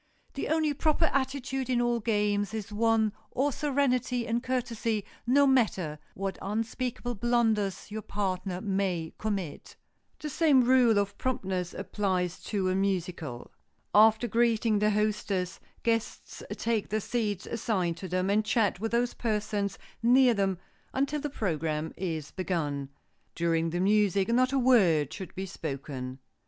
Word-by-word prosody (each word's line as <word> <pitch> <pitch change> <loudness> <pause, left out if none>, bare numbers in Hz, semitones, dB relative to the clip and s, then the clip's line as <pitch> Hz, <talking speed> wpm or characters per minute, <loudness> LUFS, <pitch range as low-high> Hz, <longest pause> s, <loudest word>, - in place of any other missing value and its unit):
The 275 - -3
only 310 -1 +2
proper 310 +3 +2
attitude 265 -1 -1
in 250 -2 +2
all 240 -1 +1
games 210 -1 0
is 215 0 -5
one 220 -1 +2 0.2
or 275 +3 0
serenity 260 -4 0
and 235 +1 0
courtesy 235 -4 -1 0.2
no 280 +3 +5
matter 200 - +2 0.2
what 195 0 -3
unspeakable 235 +4 -2
blunders 225 -4 0
your 215 +1 -4
partner 190 -2 -3
may 190 -5 -1
commit. 195 -8 -4 0.4
The 305 - -6
same 300 -4 +4
rule 245 -3 +5
of 200 0 -1
promptness 190 -8 -2
applies 185 -2 -1
to 195 -3 -1
a - - +1
musicale. 180 -9 -2 0.4
After 220 +2 +6
greeting 230 -1 +2
the 210 +1 +3
hostess, 205 -4 -1 0.2
guests 230 -1 -2
take 225 -2 -1
the 215 - 0
seats 215 -3 -2
assigned 190 -7 -1
to 190 - -6
them, 185 +2 0
and 215 +1 +3
chat 215 -4 +1
with 225 +2 -2
those 240 +1 +1
persons 210 -3 -1 0.2
near 250 +1 +5
them 195 -3 0 0.4
until 280 +2 0
the 295 - -2
program 160 - -2
is 160 -5 -4
begun. 150 -7 -2 0.5
During 165 -1 +1
the 175 +2 -2
music 200 0 +3
not 255 +2 +3
a 275 - +1
word 195 - +4
should 190 - -8
be 190 - -3
spoken. 135 -6 -5
210 Hz, 145 wpm, -29 LUFS, 185-240 Hz, 0.5 s, After